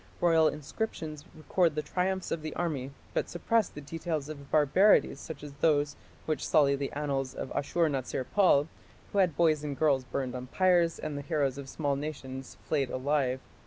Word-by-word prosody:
Royal 165 Hz, -2 st, +5 dB
inscriptions 155 Hz, 0 st, -4 dB
record 160 Hz, +1 st, +1 dB
the 150 Hz, -, -1 dB
triumphs 190 Hz, 0 st, -1 dB
of 165 Hz, -, -1 dB
the 155 Hz, 0 st, -5 dB
army, 145 Hz, -7 st, -2 dB, 0.2 s
but -, -, -1 dB
suppress 215 Hz, +5 st, +1 dB
the -, -, -9 dB
details 155 Hz, 0 st, -4 dB
of 140 Hz, -2 st, -9 dB
barbarities 155 Hz, +8 st, +4 dB
such 150 Hz, -3 st, -8 dB
as 145 Hz, -1 st, -8 dB
those 145 Hz, -2 st, +3 dB, 0.3 s
which 155 Hz, -3 st, -1 dB
sully 140 Hz, -2 st, +4 dB
the 140 Hz, 0 st, -3 dB
annals 140 Hz, -3 st, -2 dB
of -, -, -5 dB
Ashur 165 Hz, +4 st, +1 dB
natsir 130 Hz, -2 st, -2 dB
pal, 180 Hz, -8 st, +5 dB, 0.4 s
who 200 Hz, -, +1 dB
had 175 Hz, -7 st, +2 dB
boys 155 Hz, -3 st, +3 dB
and 145 Hz, -2 st, -4 dB
girls 140 Hz, -4 st, +3 dB
burned 130 Hz, 0 st, -3 dB
on 125 Hz, 0 st, -6 dB
pyres 175 Hz, 0 st, +3 dB
and 150 Hz, -2 st, -4 dB
the -, -, -4 dB
heroes 140 Hz, -3 st, 0 dB
of 135 Hz, -1 st, -8 dB
small 145 Hz, -2 st, -1 dB
nations 135 Hz, -3 st, -6 dB
flayed 140 Hz, -5 st, +1 dB
alive. 130 Hz, -1 st, 0 dB
150 Hz, 180 wpm, -30 LUFS, 140-165 Hz, 0.4 s, Royal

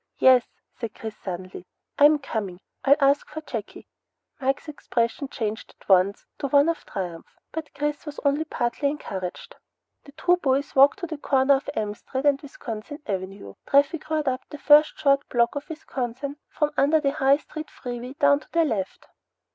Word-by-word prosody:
"Yes," 255 Hz, -2 st, +6 dB, 0.3 s
said 230 Hz, -3 st, -5 dB
Chris 220 Hz, -1 st, -7 dB
suddenly, 185 Hz, -2 st, -7 dB, 0.3 s
"I'm 295 Hz, +1 st, +7 dB
coming. 210 Hz, -10 st, -4 dB, 0.2 s
I'll 280 Hz, +1 st, +6 dB
ask 280 Hz, +1 st, +3 dB
for 310 Hz, -, -6 dB
Jakey." 225 Hz, -8 st, -7 dB, 0.5 s
Mike's 270 Hz, +3 st, -1 dB
expression 250 Hz, -3 st, -2 dB
changed 220 Hz, -5 st, -4 dB
at -, -, -22 dB
once 190 Hz, +1 st, +3 dB
to 280 Hz, -, -1 dB
one 285 Hz, +3 st, +4 dB
of 335 Hz, -, -2 dB
triumph, 175 Hz, -4 st, -6 dB
but 320 Hz, -1 st, -6 dB
Chris 295 Hz, +1 st, -2 dB
was 295 Hz, -, -6 dB
only 285 Hz, +2 st, +2 dB
partly 280 Hz, -1 st, -1 dB
encouraged. 190 Hz, -11 st, -6 dB, 0.5 s
The 280 Hz, -, -13 dB
two 355 Hz, +4 st, +2 dB
boys 275 Hz, -3 st, 0 dB
walked 275 Hz, +5 st, +6 dB
to -, -, -1 dB
the 315 Hz, -3 st, -6 dB
corner 270 Hz, 0 st, +3 dB
of 275 Hz, +1 st, -1 dB
M 210 Hz, -1 st, -1 dB
Street 265 Hz, +6 st, -5 dB
and 280 Hz, -1 st, +3 dB
Wisconsin 280 Hz, 0 st, -8 dB
Avenue. 190 Hz, -, -5 dB
Traffic 290 Hz, +3 st, +2 dB
roared 310 Hz, -2 st, 0 dB
up 255 Hz, 0 st, 0 dB
the 295 Hz, -, -8 dB
first 295 Hz, +2 st, +5 dB
short 280 Hz, -1 st, +2 dB
block 235 Hz, -1 st, +2 dB
of 285 Hz, 0 st, -6 dB
Wisconsin 280 Hz, -3 st, -5 dB
from 300 Hz, -1 st, 0 dB
under 300 Hz, +3 st, +4 dB
the 280 Hz, -2 st, +1 dB
high 275 Hz, 0 st, +3 dB
steel 310 Hz, +1 st, -8 dB
freeway 245 Hz, -2 st, -7 dB
down 285 Hz, 0 st, +4 dB
to -, -, -20 dB
their 335 Hz, -1 st, +4 dB
left. 205 Hz, -9 st, -3 dB
275 Hz, 175 wpm, -25 LUFS, 230-295 Hz, 0.5 s, I'm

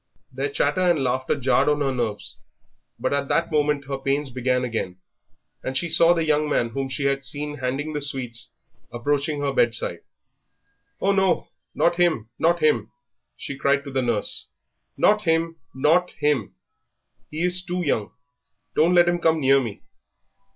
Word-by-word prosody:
Their 135 Hz, +2 st, -2 dB
chatter 145 Hz, +5 st, 0 dB
and 175 Hz, -6 st, +2 dB
laughter 130 Hz, +1 st, 0 dB
jarred 130 Hz, +1 st, +2 dB
on 150 Hz, 0 st, +1 dB
her 135 Hz, -2 st, +1 dB
nerves; 115 Hz, -4 st, -4 dB, 0.6 s
but -, -, -1 dB
at 140 Hz, 0 st, 0 dB
that 170 Hz, +4 st, 0 dB
moment 150 Hz, -2 st, +1 dB
her 135 Hz, 0 st, -4 dB
pains 135 Hz, 0 st, -1 dB
began 125 Hz, 0 st, 0 dB
again 110 Hz, -7 st, -3 dB, 0.7 s
and 130 Hz, 0 st, -2 dB
she 170 Hz, +5 st, -1 dB
saw 165 Hz, +1 st, +6 dB
the 165 Hz, -1 st, 0 dB
young 150 Hz, -1 st, +1 dB
man 120 Hz, -5 st, +1 dB
whom 135 Hz, +3 st, -3 dB
she 135 Hz, +2 st, -4 dB
had 140 Hz, 0 st, 0 dB
seen 150 Hz, +1 st, -4 dB
handing 135 Hz, +4 st, -2 dB
the 150 Hz, -, -3 dB
sweets 125 Hz, -4 st, -3 dB, 0.4 s
approaching 145 Hz, +4 st, -1 dB
her 140 Hz, -1 st, -1 dB
bedside. 115 Hz, -9 st, +1 dB, 1.0 s
"Oh, 195 Hz, -, +2 dB
no, 190 Hz, -2 st, +1 dB, 0.3 s
not 170 Hz, 0 st, +2 dB
him, 160 Hz, -11 st, +1 dB
not 170 Hz, +1 st, +2 dB
him!" 115 Hz, -8 st, +2 dB, 0.5 s
she 140 Hz, -, -6 dB
cried 140 Hz, 0 st, +2 dB
to 140 Hz, -, -8 dB
the 130 Hz, 0 st, 0 dB
nurse. 120 Hz, -4 st, -1 dB, 0.5 s
"Not 210 Hz, 0 st, +3 dB
him, 165 Hz, 0 st, +1 dB, 0.2 s
not 160 Hz, +7 st, +3 dB
him! 145 Hz, -8 st, 0 dB, 0.7 s
he 155 Hz, +3 st, -3 dB
is 180 Hz, 0 st, +1 dB
too 180 Hz, 0 st, -3 dB
young! 110 Hz, -8 st, -1 dB, 0.6 s
Do 155 Hz, -, +4 dB
not 180 Hz, -, +2 dB
let 175 Hz, 0 st, +6 dB
him 175 Hz, 0 st, +1 dB
come 160 Hz, -1 st, +2 dB
near 135 Hz, -1 st, +4 dB
me!" 110 Hz, -5 st, -6 dB
140 Hz, 170 wpm, -23 LUFS, 130-160 Hz, 1.0 s, saw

